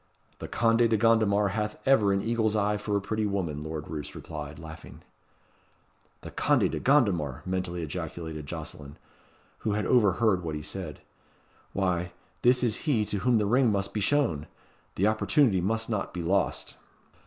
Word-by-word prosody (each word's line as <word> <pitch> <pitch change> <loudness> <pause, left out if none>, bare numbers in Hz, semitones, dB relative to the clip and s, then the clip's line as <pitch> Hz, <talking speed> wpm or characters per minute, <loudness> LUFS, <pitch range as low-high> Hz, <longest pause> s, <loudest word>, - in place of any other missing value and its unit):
"The - - -6
Conde 115 0 +3
de 110 - +3
Gondomar 105 -2 +3
hath 105 +1 -2
ever 110 -7 +5
an 95 0 +1
eagle's 110 -2 +1
eye 105 0 +1
for 105 0 -1
a - - -2
pretty 110 +2 -1
woman," 85 -7 -2
Lord 80 -1 -5
Roos 75 -2 -6
replied, 75 -2 -7
laughing. 80 0 -11 1.2
"The - - -9
Conde - - +2
de - - -3
Gondomar!" 95 - +2
mentally 90 -2 -2
ejaculated 80 0 -5
Jocelyn, 70 0 -7 0.6
who 105 - -1
had 105 0 -1
overheard 105 -4 +3
what 80 -2 -3
he 75 - -5
said. 85 -2 -6 0.7
"Why, 90 -2 -1 0.3
this 125 +1 +4
is 120 +6 -1
he 110 -7 +2
to 100 - -2
whom 120 +2 +3
the 105 - +1
ring 120 +2 +3
must 100 -1 -1
be 105 - -1
shown. 100 - +1 0.5
The 95 - +1
opportunity 110 -1 +3
must 110 +4 0
not 105 -5 -3
be 90 - -3
lost." 95 +3 0
100 Hz, 165 wpm, -28 LUFS, 85-110 Hz, 1.2 s, ever